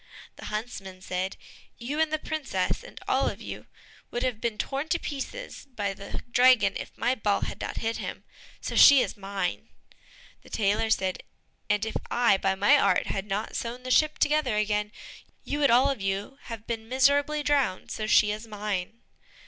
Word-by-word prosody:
The -, -, -9 dB
huntsman 195 Hz, -4 st, -6 dB
said, 185 Hz, +1 st, -3 dB, 0.4 s
"You 270 Hz, +6 st, -4 dB
and 320 Hz, -1 st, +1 dB
the 310 Hz, -, +1 dB
princess, 290 Hz, -12 st, -2 dB
and -, -, -11 dB
all -, -, +2 dB
of -, -, -8 dB
you, -, -, -8 dB, 0.4 s
would 240 Hz, -, -3 dB
have 245 Hz, -4 st, -1 dB
been 230 Hz, -3 st, -1 dB
torn 275 Hz, +6 st, -2 dB
to 340 Hz, -, +1 dB
pieces 305 Hz, -, -6 dB
by 200 Hz, -3 st, -1 dB
the 200 Hz, +1 st, -7 dB
dragon 245 Hz, -6 st, +5 dB
if -, -, -7 dB
my 250 Hz, -, +2 dB
ball 205 Hz, -5 st, 0 dB
had -, -, -4 dB
not -, -, -4 dB
hit 225 Hz, 0 st, -1 dB
him, -, -, -6 dB, 0.4 s
so -, -, -5 dB
she 280 Hz, -2 st, +9 dB
is -, -, -5 dB
mine." 200 Hz, -1 st, -3 dB, 0.7 s
The -, -, -17 dB
tailor 210 Hz, +1 st, +1 dB
said, 190 Hz, -4 st, 0 dB, 0.5 s
"And 210 Hz, +1 st, +2 dB
if 220 Hz, -, -2 dB
I, 240 Hz, -5 st, +4 dB
by 195 Hz, 0 st, 0 dB
my 200 Hz, +2 st, +5 dB
art, 195 Hz, -2 st, +3 dB
had 195 Hz, +1 st, -3 dB
not 210 Hz, +2 st, -3 dB
sewn 240 Hz, +2 st, -4 dB
the 255 Hz, -, -4 dB
ship 305 Hz, +4 st, +4 dB
together 300 Hz, -6 st, +2 dB
again, 210 Hz, 0 st, 0 dB, 0.5 s
you 290 Hz, -, -3 dB
would 285 Hz, -2 st, +4 dB
all 255 Hz, +4 st, +5 dB
of 260 Hz, -7 st, -5 dB
you 195 Hz, +8 st, -3 dB
have 225 Hz, -2 st, -7 dB
been 225 Hz, -1 st, -5 dB
miserably 285 Hz, +3 st, +3 dB
drowned, 280 Hz, -10 st, +1 dB
so 215 Hz, -, -3 dB
she 210 Hz, -1 st, +5 dB
is 215 Hz, +2 st, -6 dB
mine." 210 Hz, 0 st, -4 dB
225 Hz, 185 wpm, -27 LUFS, 200-270 Hz, 0.7 s, she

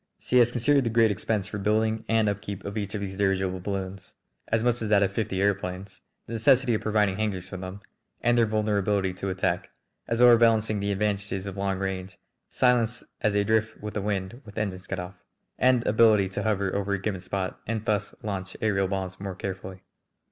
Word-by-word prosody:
She 125 Hz, -, +2 dB
has 120 Hz, 0 st, +5 dB
considered 135 Hz, +3 st, +3 dB
the 115 Hz, -, 0 dB
great 115 Hz, -1 st, +4 dB
expense 100 Hz, 0 st, -1 dB
for 105 Hz, -, -5 dB
building 110 Hz, +2 st, +1 dB
and 110 Hz, -1 st, +3 dB
upkeep 100 Hz, -1 st, -4 dB
of 100 Hz, +1 st, -5 dB
each 105 Hz, -1 st, -3 dB
of 105 Hz, -, -3 dB
these 95 Hz, -1 st, -5 dB
dirigible 95 Hz, -2 st, +1 dB
balloons 95 Hz, 0 st, -5 dB, 0.3 s
as 110 Hz, 0 st, +1 dB
much 120 Hz, -1 st, +1 dB
as 110 Hz, -, -2 dB
that 100 Hz, -1 st, +5 dB
of 100 Hz, 0 st, 0 dB
fifty 105 Hz, -3 st, -2 dB
aëroplanes 95 Hz, -1 st, -2 dB, 0.2 s
the 115 Hz, -, -8 dB
necessity 125 Hz, +2 st, +4 dB
of 110 Hz, -, 0 dB
providing 105 Hz, -3 st, +1 dB
hangars 100 Hz, -4 st, -2 dB
for 95 Hz, -, -6 dB
them, 95 Hz, +2 st, -7 dB, 0.4 s
and 120 Hz, 0 st, +2 dB
their 115 Hz, -2 st, +4 dB
vulnerability 105 Hz, -3 st, +1 dB
to 95 Hz, +1 st, -4 dB
attack, 95 Hz, 0 st, -1 dB, 0.4 s
as 115 Hz, -, -1 dB
overbalancing 115 Hz, -3 st, +5 dB
the 100 Hz, 0 st, -1 dB
advantages 100 Hz, -1 st, -1 dB
of 100 Hz, -1 st, -5 dB
long 100 Hz, -1 st, -1 dB
range, 95 Hz, -1 st, -4 dB, 0.3 s
silence 125 Hz, -1 st, +2 dB, 0.2 s
as 110 Hz, -, +2 dB
they 100 Hz, 0 st, +2 dB
drift 110 Hz, +1 st, 0 dB
with 105 Hz, 0 st, -6 dB
the 105 Hz, -, -2 dB
wind 100 Hz, +4 st, -3 dB
with 105 Hz, -4 st, -13 dB
engines 95 Hz, -4 st, -3 dB
cut 95 Hz, -, -3 dB
off, 90 Hz, 0 st, -8 dB, 0.4 s
and 125 Hz, -2 st, +3 dB
ability 110 Hz, -2 st, +5 dB
to 95 Hz, -, -4 dB
hover 100 Hz, -3 st, 0 dB
over 100 Hz, 0 st, -1 dB
a 100 Hz, -, 0 dB
given 95 Hz, -1 st, -3 dB
spot 95 Hz, 0 st, -3 dB
and 110 Hz, -1 st, -2 dB
thus 105 Hz, -1 st, -1 dB
launch 95 Hz, -2 st, -4 dB
aërial 100 Hz, -3 st, +1 dB
bombs 95 Hz, -1 st, -3 dB
more 95 Hz, -1 st, -5 dB
carefully. 95 Hz, -1 st, -6 dB
100 Hz, 200 wpm, -26 LUFS, 95-110 Hz, 0.4 s, has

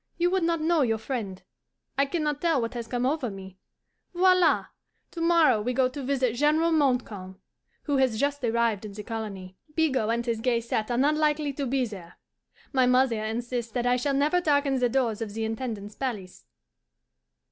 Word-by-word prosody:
You 350 Hz, +1 st, +2 dB
would 380 Hz, 0 st, +1 dB
not 335 Hz, -1 st, 0 dB
know 325 Hz, 0 st, +2 dB
your 225 Hz, -4 st, +2 dB
friend. 215 Hz, -5 st, -5 dB, 0.5 s
I 275 Hz, +1 st, +2 dB
can 325 Hz, +2 st, -2 dB
not 295 Hz, -1 st, -1 dB
tell 330 Hz, -5 st, +2 dB
what 230 Hz, 0 st, -3 dB
has 235 Hz, -2 st, -5 dB
come 245 Hz, +1 st, -1 dB
over 275 Hz, -2 st, 0 dB
me. 190 Hz, -1 st, -10 dB, 0.6 s
Voila! 365 Hz, -2 st, +4 dB, 0.5 s
To 335 Hz, -, -6 dB
morrow 330 Hz, -9 st, +4 dB
we 250 Hz, +4 st, -1 dB
go 255 Hz, 0 st, +3 dB
to 280 Hz, +2 st, -7 dB
visit 260 Hz, -3 st, 0 dB
General 305 Hz, +5 st, +2 dB
Montcalm, 235 Hz, -, 0 dB, 0.4 s
who 285 Hz, -2 st, 0 dB
has 255 Hz, -5 st, +2 dB
just 285 Hz, 0 st, -1 dB
arrived 230 Hz, -3 st, +1 dB
in 210 Hz, -2 st, -7 dB
the 210 Hz, +1 st, -7 dB
colony. 200 Hz, -5 st, -6 dB, 0.2 s
Bigot 265 Hz, -9 st, +1 dB
and 235 Hz, +1 st, 0 dB
his 230 Hz, -2 st, -2 dB
gay 240 Hz, -1 st, +2 dB
set 225 Hz, -1 st, -2 dB
are 240 Hz, -, 0 dB
not 285 Hz, +4 st, +3 dB
likely 300 Hz, -1 st, +1 dB
to 275 Hz, 0 st, -3 dB
be 260 Hz, 0 st, +1 dB
there. 190 Hz, -6 st, -10 dB, 0.6 s
My 260 Hz, -2 st, +3 dB
mother 250 Hz, -3 st, +3 dB
insists 235 Hz, +1 st, -3 dB
that 245 Hz, -1 st, -1 dB
I 245 Hz, 0 st, +3 dB
shall 275 Hz, +3 st, 0 dB
never 300 Hz, +6 st, +2 dB
darken 285 Hz, -4 st, +2 dB
the 245 Hz, -1 st, +2 dB
doors 235 Hz, -4 st, 0 dB
of 210 Hz, -2 st, -5 dB
the 225 Hz, 0 st, -2 dB
Intendant's 220 Hz, -2 st, -4 dB
palace. 210 Hz, -8 st, -5 dB
250 Hz, 190 wpm, -26 LUFS, 225-290 Hz, 0.6 s, Voila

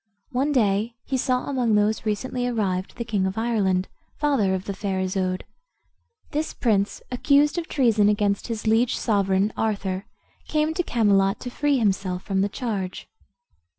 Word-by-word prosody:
One 270 Hz, +3 st, +1 dB
day 220 Hz, -2 st, +1 dB
he 270 Hz, -, -2 dB
saw 255 Hz, 0 st, 0 dB
among 245 Hz, -6 st, +1 dB
those 210 Hz, +1 st, +1 dB
recently 245 Hz, +4 st, -1 dB
arrived 195 Hz, -6 st, -2 dB
the 235 Hz, -, -3 dB
king 205 Hz, -4 st, 0 dB
of 190 Hz, -, -4 dB
Ireland, 200 Hz, -5 st, +1 dB, 0.3 s
father 260 Hz, -11 st, +2 dB
of 185 Hz, -, -5 dB
the 200 Hz, -, -3 dB
fair 195 Hz, -1 st, -2 dB
Isoude. 185 Hz, 0 st, -1 dB, 0.9 s
This 305 Hz, +2 st, -2 dB
prince, 205 Hz, -4 st, 0 dB
accused 290 Hz, +5 st, +3 dB
of 335 Hz, -, -6 dB
treason 220 Hz, -7 st, +3 dB
against 205 Hz, -1 st, +1 dB
his 230 Hz, -2 st, -4 dB
liege 225 Hz, +2 st, +3 dB
sovereign, 200 Hz, -1 st, +1 dB
Arthur, 200 Hz, -3 st, -2 dB, 0.4 s
came 305 Hz, 0 st, +1 dB
to 355 Hz, -, 0 dB
Camelot 200 Hz, -, +2 dB
to 245 Hz, -, -5 dB
free 290 Hz, +2 st, +1 dB
himself 190 Hz, -5 st, 0 dB
from 195 Hz, -1 st, 0 dB
the 200 Hz, -, +1 dB
charge. 200 Hz, -5 st, -4 dB
215 Hz, 155 wpm, -24 LUFS, 195-250 Hz, 0.9 s, accused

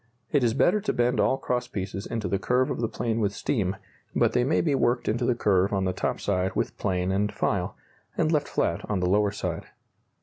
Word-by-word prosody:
It 145 Hz, -3 st, +3 dB
is 115 Hz, -1 st, +2 dB
better 190 Hz, +8 st, +3 dB
to 215 Hz, -, -1 dB
bend 120 Hz, +1 st, +1 dB
all 135 Hz, -, +3 dB
cross 125 Hz, -1 st, -2 dB
pieces 95 Hz, 0 st, -5 dB
into 115 Hz, -3 st, -3 dB
the 100 Hz, -, 0 dB
curve 125 Hz, +4 st, +1 dB
of -, -, -3 dB
the 115 Hz, -, +1 dB
plane 115 Hz, 0 st, -2 dB
with 100 Hz, -2 st, 0 dB
steam, 100 Hz, -8 st, -1 dB, 0.4 s
but -, -, +3 dB
they 125 Hz, -, +3 dB
may 140 Hz, +5 st, +2 dB
be 155 Hz, -4 st, +1 dB
worked 120 Hz, -2 st, +1 dB
into 120 Hz, +3 st, 0 dB
the 120 Hz, -, +2 dB
curve 100 Hz, -4 st, +2 dB
on 95 Hz, -2 st, 0 dB
the 95 Hz, -, 0 dB
top -, -, -2 dB
side 95 Hz, -1 st, -1 dB
with -, -, -1 dB
plane 90 Hz, -2 st, 0 dB
and 100 Hz, +2 st, +1 dB
file, 90 Hz, -4 st, -1 dB, 0.4 s
and 155 Hz, -, +2 dB
left 150 Hz, -3 st, +1 dB
flat 85 Hz, 0 st, -1 dB
on 105 Hz, -3 st, 0 dB
the 90 Hz, -, +1 dB
lower 105 Hz, +2 st, +3 dB
side. 100 Hz, -, -4 dB
105 Hz, 230 wpm, -26 LUFS, 95-125 Hz, 0.4 s, It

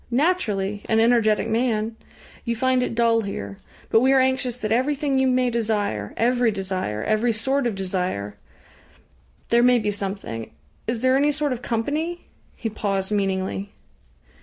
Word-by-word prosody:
Naturally 220 Hz, -, 0 dB
an 220 Hz, -, +3 dB
energetic 225 Hz, -2 st, +3 dB
man! 225 Hz, -1 st, 0 dB, 0.5 s
You 235 Hz, -1 st, -1 dB
find 260 Hz, +2 st, +2 dB
it 240 Hz, -, -2 dB
dull 230 Hz, -1 st, +3 dB
here. 100 Hz, -, -5 dB, 0.3 s
But 225 Hz, -, +6 dB
we 260 Hz, +3 st, +3 dB
are 270 Hz, -, +5 dB
anxious 260 Hz, -2 st, +1 dB
that 215 Hz, -3 st, -4 dB
everything 275 Hz, +3 st, +1 dB
you 265 Hz, -, +3 dB
may 255 Hz, -1 st, +2 dB
desire 210 Hz, -, -1 dB
every 245 Hz, 0 st, +3 dB
desire 190 Hz, -, -3 dB
every 215 Hz, +2 st, +2 dB
sort 265 Hz, +4 st, 0 dB
of 225 Hz, -, -2 dB
desire... 180 Hz, -, -2 dB, 1.1 s
There 235 Hz, 0 st, +4 dB
may 250 Hz, 0 st, +5 dB
be 210 Hz, -3 st, 0 dB
something. 195 Hz, -, -5 dB, 0.4 s
Is 230 Hz, 0 st, -2 dB
there 255 Hz, 0 st, +3 dB
any 290 Hz, +2 st, +3 dB
sort 295 Hz, -2 st, -1 dB
of 245 Hz, -, -6 dB
company?" 300 Hz, +10 st, -2 dB, 0.3 s
He 230 Hz, -, -4 dB
paused 200 Hz, -2 st, -2 dB
meaningly. 195 Hz, 0 st, -1 dB
225 Hz, 155 wpm, -23 LUFS, 200-255 Hz, 1.1 s, But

